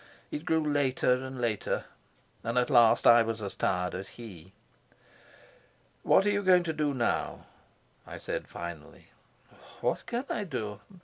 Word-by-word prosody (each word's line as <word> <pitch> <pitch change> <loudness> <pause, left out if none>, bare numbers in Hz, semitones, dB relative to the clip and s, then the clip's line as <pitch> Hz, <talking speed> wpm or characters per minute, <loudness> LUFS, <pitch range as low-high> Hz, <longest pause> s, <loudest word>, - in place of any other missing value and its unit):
It 150 - -5
grew 160 -3 +1
later 135 -3 +2
and 130 -1 -7
later, 115 -4 -1 0.6
and 115 +2 -2
at 125 - +2
last 120 -3 +5
I 120 0 +8
was 115 0 -2
as 100 -2 -5
tired 90 0 0
as 95 +1 -5
he. 95 -7 -11 1.5
"What - - +4
are 205 - +3
you 205 0 +1
going 185 -2 +5
to 165 -2 -2
do 150 -2 -1
now?" 120 -2 -1 0.6
I - - -8
said - - -4
finally. 85 -3 -9 0.7
"What - - -1
can 240 +3 -2
I 210 - -2
do? 105 - -4
125 Hz, 150 wpm, -29 LUFS, 105-160 Hz, 1.5 s, I